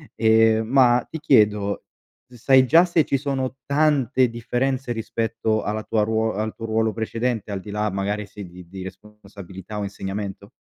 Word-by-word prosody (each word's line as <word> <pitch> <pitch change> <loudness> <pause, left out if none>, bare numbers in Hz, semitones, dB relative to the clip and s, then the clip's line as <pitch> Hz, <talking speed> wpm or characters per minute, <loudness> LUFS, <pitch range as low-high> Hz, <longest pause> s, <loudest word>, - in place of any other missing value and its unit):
ehm, 110 0 +4
ma 125 -1 +4
ti 160 - -6
chiedo, 105 -8 +2 0.5
sai 130 +2 +3
già 165 +7 +6
se 170 -4 +2
ci 140 - 0
sono 135 -2 -3
tante 140 -3 +2
differenze 125 +2 -2
rispetto 115 -1 -2
alla 110 +1 -3
tua 110 - 0
ruo 110 0 0
al 110 +2 -3
tuo 115 - -7
ruolo 110 0 0
precedente? 115 -1 -3
Al 100 - -3
di 105 - -11
là, 105 0 -1
magari, 100 +2 -2
se 100 +1 -10
di 90 0 -12
di 95 +2 -9
responsabilità 100 0 -10
o 105 - -2
insegnamento? 100 0 -6
110 Hz, 165 wpm, -23 LUFS, 105-125 Hz, 0.5 s, già